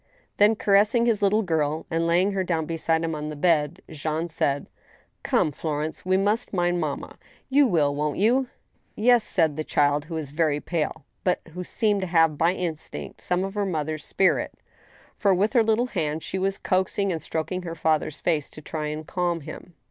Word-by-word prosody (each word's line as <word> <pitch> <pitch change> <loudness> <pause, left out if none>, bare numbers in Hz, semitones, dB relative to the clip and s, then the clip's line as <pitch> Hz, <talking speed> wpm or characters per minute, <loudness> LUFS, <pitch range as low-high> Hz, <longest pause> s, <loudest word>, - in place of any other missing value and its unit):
Th^n, 210 +1 +5
caressing 210 +4 +3
his 225 -3 +1
little 210 +2 +3
girl 160 -3 -1
and 165 0 +1
laying 180 +4 +3
her 195 -1 -1
down 165 -3 -1
beside 165 0 0
him 165 0 -1
on 150 0 -4
the 150 - -5
bed, 155 +1 +1
Jean 155 +2 -3
said: 145 -4 +1
*• - - -17 0.5
Come, 155 - +1
Florence, 155 +1 -3
we 185 +1 +2
must 210 +5 0
mind 175 -1 +1
mamma. 155 -4 -4 0.3
You 280 0 +5
will, 150 -8 +2
won't 150 0 -2
you? 250 +6 +3 0.2
" - - -43
" - - -42
Yes," 240 +1 +4
said 160 -7 +1
the 155 - -1
child, 145 0 +1
who' 165 0 -6
was 150 -4 -4
very 150 -1 +1
pale, 160 -2 -3 0.2
but 180 - +1
who 180 +1 -5
seemed 205 +2 +1
to 185 - -2
have 165 -3 +3
"by 165 +4 +2
instinct 170 -4 -5
some 180 +1 0
of 195 0 -4
her 205 -1 -1
mother's 155 -5 -2
spirit, 190 - +1 0.6
for, 200 -3 +3
with 205 +6 +1
her 240 - +5
little 225 +2 +2
hands, 160 -9 -2
she 190 - -3
was 195 +1 0
coaxing 190 +1 0
and 165 -2 -3
stroking 165 +5 -3
her 165 -2 -6
father's 155 -1 0
face, 155 -5 0
to 155 - -12
try 155 0 -4
and 155 +1 -5
calm 175 -1 -1
him. 170 +4 -10
170 Hz, 200 wpm, -25 LUFS, 155-195 Hz, 0.6 s, Th^n